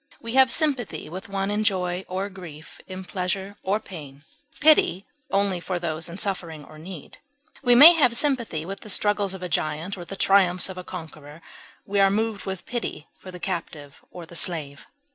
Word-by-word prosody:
We 230 0 -6
have 265 0 +6
sympathy 270 - 0
with 190 +5 -7
one 195 0 -1
in 210 +1 0
joy 185 -3 0
or 190 +2 -2
grief, 170 -5 -11
in 185 0 -7
pleasure 190 +2 -3
or 200 +3 0
pain, 145 -9 -11 0.4
pity 285 - +5 0.2
only 195 -2 +1
for 180 +1 -3
those 165 -1 -3
in 170 - -8
suffering 170 -7 -3
or 155 - -14
need; 170 -2 -10 0.4
we 245 -3 +5
may 300 +8 +11
have 250 -8 +3
sympathy 235 - 0
with 195 +2 -6
the 215 - -11
struggles 205 -1 +1
of 185 - -9
a - - -2
giant 160 +4 -2
or - - -6
the 195 - -7
triumphs 190 -2 +3
of 185 - -7
a - - -6
conqueror; 155 -4 -9 0.5
we 200 0 0
are 195 0 +6
moved 215 0 -1
with 190 -2 -5
pity 230 -10 -5
for 185 - -13
the 180 -1 -9
captive 165 -6 -5
or 175 -2 -9
the 170 - -13
slave. 150 -5 -3
190 Hz, 190 wpm, -25 LUFS, 170-205 Hz, 0.5 s, may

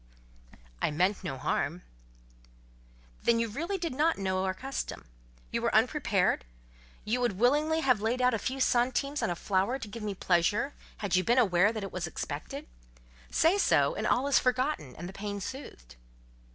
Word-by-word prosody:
"I - - +2
meant 180 +7 +1
no 135 - -4
harm." 160 +6 -1 1.4
"Then 235 - +3
you 230 0 +1
really 330 - -3
did 335 -6 -3
not 310 +5 +2
know 190 -1 -1
our 190 - 0
custom? 270 +6 -5 0.5
You - - -1
were - - 0
unprepared? - - +2 0.6
You 240 +4 0
would 240 -4 +1
willingly 300 +8 +3
have 255 -8 +3
laid 230 +4 0
out 250 -1 +3
a 225 - 0
few 265 +5 -3
centimes 260 +4 +1
on - - 0
a 175 - -1
flower 195 +8 0
to 230 - -7
give 220 +2 -8
me 210 -2 -3
pleasure, 190 +10 +1 0.2
had 200 -3 -1
you 185 - +3
been 240 +6 +2
aware 200 -4 +4
that 215 -2 -5
it 195 - -5
was 175 -2 -3
expected? 160 - -6 0.6
Say 340 +6 +3
so, - - +3
and - - -2
all 255 - +2
is 280 - +5
forgotten, 255 - 0
and 175 - -7
the 190 - -9
pain 205 0 -4
soothed." 125 - -8
225 Hz, 180 wpm, -30 LUFS, 185-265 Hz, 1.4 s, is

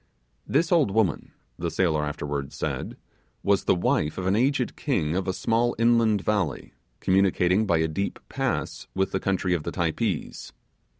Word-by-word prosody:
This 170 +2 +1
old 165 - +4
woman, 100 -5 0 0.3
the 85 0 -1
sailor 80 -4 +1
afterwards 75 -2 -4
said, - - -4 0.5
was 100 -1 +2
the - - +4
wife 80 -3 0
of 95 - -3
an 95 +2 +2
aged 130 +2 +1
king 85 - -1
of 95 +1 -1
a - - +2
small 115 +5 +1
island 115 -3 +3
valley, 100 -10 -1 0.3
communicating 95 +1 +2
by 85 -3 +3
a 80 0 +1
deep 100 +6 -3
pass - - -3
with 95 0 0
the 95 - 0
country 95 -1 0
of 85 - 0
the - - -4
Typees. 85 +1 -2
95 Hz, 165 wpm, -26 LUFS, 85-110 Hz, 0.5 s, old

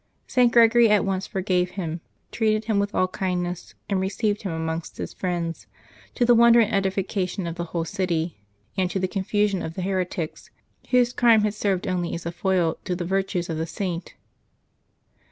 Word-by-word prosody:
St. 250 -2 +3
Gregory 235 -1 +6
at 210 -1 +4
once 190 0 -2
forgave 185 -2 0
him, 165 -2 -3 0.3
treated 215 -1 +1
him 215 -3 +1
with 200 +1 -1
all 185 - +3
kindness, 180 -2 -3
and 195 -2 0
received 205 +2 -1
him 195 - -3
amongst 160 0 -4
his - - -5
friends, 170 - -3 0.5
to 245 - +2
the 240 - +6
wonder 235 0 +7
and 225 -1 +2
edification 195 -1 -1
of 170 - -3
the 170 0 -4
whole 165 0 -3
city, 170 - -2 0.4
and 185 -1 +1
to 195 - -2
the 190 0 0
confusion 200 0 0
of 160 - -5
the 185 - -3
heretics, 180 -4 -3 0.4
whose 250 -1 +3
crime 230 -3 +5
had 210 -1 +1
served 200 -3 -1
only 180 -2 -1
as 170 - -7
a 170 - -2
foil 175 -2 0
to 180 - -2
the 175 -1 -4
virtue 190 0 0
of 160 - -3
the 160 - -2
Saint. 170 +1 -4
190 Hz, 185 wpm, -24 LUFS, 175-210 Hz, 0.5 s, wonder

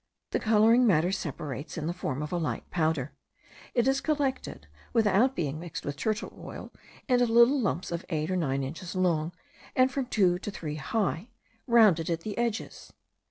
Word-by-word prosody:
The - - +1
colouring 225 +3 +4
matter 175 -2 +3
separates 150 -5 -5
in 155 - -3
the 170 - -1
form 150 -5 -3
of 150 - -6
a 175 - 0
light 165 -3 -3
powder. 155 -5 0 0.6
It 240 0 +3
is 270 0 +2
collected, 285 -4 -2 0.3
without 225 +4 +3
being 155 -2 -2
mixed 165 -2 -7
with 145 - -3
turtle 215 +7 -2
oil, - - -9 0.3
into 245 -2 +3
little 235 +4 +5
lumps 185 -5 -2 0.2
eight 155 0 -1
or - - +1
nine 140 -6 0
inches 165 +7 -6
long, 170 -3 +1 0.4
and 255 0 +4
from 260 -1 -2
two 185 -7 +2
to 205 - -5
three 155 -6 -5
high, 200 - -2 0.4
rounded 210 -9 +5
at 165 -1 -1
the 210 +3 -5
edges. 235 -2 -3
185 Hz, 170 wpm, -28 LUFS, 160-235 Hz, 0.6 s, little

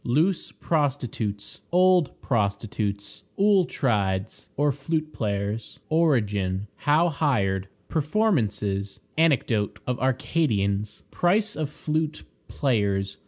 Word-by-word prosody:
Loose 160 +9 +1
Prostitutes. 125 -9 -2
Old 180 -2 +4
Prostitutes. 100 -2 -2 0.2
Auletrides, 135 - +1
or 145 +1 +3
Flute 155 +3 -2
players. 105 0 -3
Origin. 105 - +1
How 155 +4 +3
hired. 100 - 0 0.2
Performances. 110 - 0 0.2
Anecdote 130 -10 +2
of 125 -1 -2
Arcadians. 110 -7 0
Price 205 +4 +2
of 155 -2 -2
Flute 155 +1 -2 0.2
players. 100 -7 0
125 Hz, 85 wpm, -25 LUFS, 100-160 Hz, 0.2 s, Old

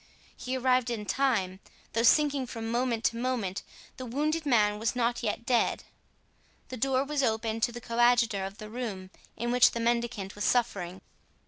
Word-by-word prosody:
He 255 +1 -4
arrived 255 -1 +2
in 220 -3 -3
time. 200 -7 0 0.3
Though 230 - +1
sinking 280 +1 +3
from 225 -1 -5
moment 240 -1 0
to 230 - +1
moment, 235 -6 -2 0.4
the 255 - -6
wounded 305 +5 -1
man 210 -5 +3
was 225 +3 -1
not 240 0 0
yet 235 0 -3
dead. 245 -4 +1 0.9
The 255 - -5
door 265 +2 +1
was 290 0 -1
opened 225 -2 -1
to 240 - +2
the 240 0 -8
coadjutor 235 -3 +2
of 195 +2 -6
the 215 - -8
room 210 -5 -6 0.3
in 240 +1 -2
which 250 0 +5
the 235 - -3
mendicant 235 -4 -1
was 205 - -5
suffering. 195 -8 0
235 Hz, 175 wpm, -29 LUFS, 220-255 Hz, 0.9 s, which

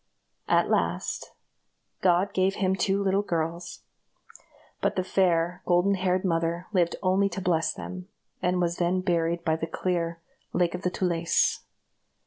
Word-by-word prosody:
At - - +3
last, - - -1 0.7
God 185 +2 +3
gave 190 +1 +2
him 190 -1 +1
two 195 +2 +1
little 195 +1 +2
girls; 170 -2 -3 1.0
but - - +1
the 185 - 0
fair, 180 -1 +1
golden 180 +3 +3
haired 185 0 0
mother 170 0 0
lived 175 -3 +2
only 195 +2 +3
to 195 - -5
bless 170 -3 +1
them, 185 0 -7 0.3
and 180 0 +1
was 175 -1 0
then 180 +1 +1
buried 170 -2 0
by 160 -1 +2
the 165 - -3
clear 170 -1 -2 0.3
"Lake 175 -2 +1
of 180 - -4
the 180 - 0
Tulés." 170 -2 +1
180 Hz, 145 wpm, -27 LUFS, 170-185 Hz, 1.0 s, At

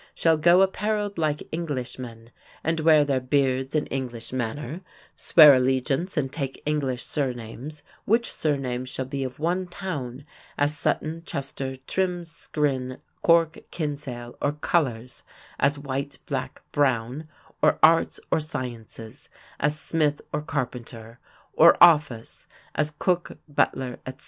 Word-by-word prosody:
shall 165 -1 +4
go 170 +4 +5
appareled 205 0 -1
like 150 -2 -1
Englishmen 125 -7 -5 0.3
and 160 +1 0
wear 155 -2 +5
their 135 -2 +1
beards 130 +1 0
in 150 - +2
English 125 -3 -5
manner, 130 +6 -3 0.3
swear 150 -4 +8
allegiance 130 +7 +1
and 135 -3 -1
take 135 -4 -3
English 140 -5 -1
sirnames, 130 +2 -4 0.2
which 230 +3 +2
sirnames 130 -4 -1
shall 130 +1 -3
be 135 +1 -3
of 130 -1 -5
one 180 +4 -1
towne, 145 -8 -5 0.3
as 145 +1 +1
Sutton, 160 +2 -1
Chester, 135 -3 -4
Trim, 180 0 -1
Skryne, 140 -6 -2 0.2
Cork, 165 -1 +4
Kinsale; 140 -6 -5
or 145 - +1
colours, 130 -6 -1 0.4
as 145 +2 +2
white, 140 0 -4
black, 130 -3 -4
brown; 135 +1 0 0.3
or - - +4
arts, 165 +1 +5
or - - +3
sciences, 120 -6 -7 0.3
as 150 +2 0
smith 150 -3 0
or 150 - 0
carpenter; 125 -6 -5 0.3
or 170 +2 +7
office, 150 -9 +4 0.3
as 150 0 0
cook, 175 +3 -1
butler, 130 -3 0
etc. 130 +2 -7
145 Hz, 130 wpm, -25 LUFS, 130-160 Hz, 0.4 s, swear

